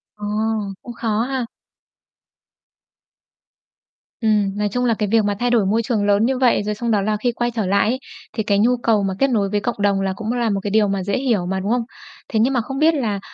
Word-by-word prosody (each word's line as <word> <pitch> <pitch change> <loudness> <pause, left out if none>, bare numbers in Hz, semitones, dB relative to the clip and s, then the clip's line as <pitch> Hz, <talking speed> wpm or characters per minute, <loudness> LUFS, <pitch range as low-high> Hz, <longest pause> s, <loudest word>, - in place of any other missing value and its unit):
Ồ, 210 - -7 0.6
cũng 240 - -9
khó 225 -2 -1
ha. 255 -1 -2 2.8
Ừm, 205 -2 +1
nói 210 0 0
chung 245 +4 -1
là 230 - +3
cái 210 -2 -2
việc 225 -1 +4
mà 205 0 0
thay 245 0 +1
đổi 230 -5 +3
môi 220 +4 +2
trường 220 -3 0
lớn 205 +2 +3
như 260 +1 0
vậy, 245 -5 +3
rồi 210 0 -2
xong 235 +2 -2
đó 205 -2 +2
là 210 +1 0
khi 240 +3 0
quay 240 +1 -2
trở 220 -4 -2
lại 200 +3 +2
ấy 255 +3 -1 0.3
thì 220 - -2
cái 200 -1 +1
nhu 245 +3 +3
cầu 215 -3 +3
mà 190 -1 -1
kết 275 0 +3
nối 205 -5 +1
với 205 0 0
cộng 240 +3 -2
đồng 200 -1 +2
là 190 -1 -1
cũng 220 +3 -4
là 240 -2 0
một 200 -1 0
cái 205 - -2
điều 215 -1 +3
mà 195 -1 -1
dễ 200 +4 -1
hiểu 235 -9 0
mà, 190 +1 -2
đúng 200 +4 -2
hông? 245 0 +2 0.5
Thế 220 - 0
nhưng 250 +5 +3
mà 245 - +2
không 270 +4 -5
biết 320 +1 +4
là 220 -9 -1
220 Hz, 250 wpm, -20 LUFS, 205-240 Hz, 2.8 s, việc